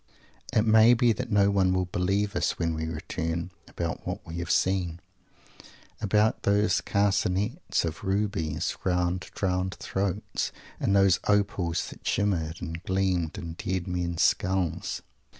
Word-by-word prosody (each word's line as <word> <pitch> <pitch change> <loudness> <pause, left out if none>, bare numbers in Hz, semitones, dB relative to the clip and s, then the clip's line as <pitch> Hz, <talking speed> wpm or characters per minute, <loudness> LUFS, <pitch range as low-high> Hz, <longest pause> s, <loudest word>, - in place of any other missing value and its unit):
It 110 - +3
may 110 +2 +7
be 120 0 +4
that 125 +2 -5
no 100 -1 +4
one 95 -2 +3
will 90 0 +1
believe 100 +4 0
us, - - 0
when 85 -1 0
we 80 0 -3
return, 80 +2 -3 0.2
about - - -4
what - - -4
we 85 +1 -6
have 85 0 -4
seen! 90 -3 +1 1.0
About 105 +1 +2
those 100 +1 +2
carcanets 100 - 0
of 80 +2 -5
rubies 95 -6 -1
round 90 0 0
drowned 95 -1 -1
throats 100 +1 -2 0.3
and 100 - +1
those 95 -2 +5
opals 100 -4 +1
that - - -10
shimmered 85 -6 0
and 80 +1 -5
gleamed 95 -2 0
in 85 -4 -5
dead 90 +1 -3
men's 90 -2 -1
skulls! 95 -3 0
95 Hz, 140 wpm, -27 LUFS, 85-100 Hz, 1.0 s, may